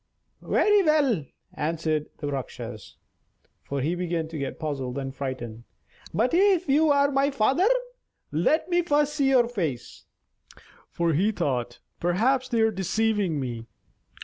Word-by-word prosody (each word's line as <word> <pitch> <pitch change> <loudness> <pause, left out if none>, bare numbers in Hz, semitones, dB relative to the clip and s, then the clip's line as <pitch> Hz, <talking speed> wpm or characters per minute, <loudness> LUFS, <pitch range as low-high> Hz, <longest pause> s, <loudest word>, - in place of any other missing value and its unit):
"Very 415 -1 +3
well," 285 - +2 0.3
answered 155 -1 -1
the 145 -2 -4
Rakshas 120 -5 -6 0.7
(for 140 -1 -4
he 155 +6 0
began 175 -2 -2
to 165 - -6
get 140 - -4
puzzled 135 -4 -4
and 135 -1 -4
frightened); 125 -5 -5 0.5
"but 240 +4 +1
if 375 -1 +3
you 300 +3 +4
are 280 0 +3
my 275 +1 +2
father, 275 - +2 0.6
let 175 - +1
me 350 -1 +2
first 295 -3 +1
see 275 -3 +2
your 250 -3 +4
face." 165 - -4 0.8
(For 170 -1 0
he 195 +9 +2
thought: 125 - -2 0.2
"Perhaps 255 +10 +1
they 230 -3 +1
are 220 0 +3
deceiving 195 -3 0
me.") 120 -3 -5
180 Hz, 140 wpm, -26 LUFS, -, 0.8 s, you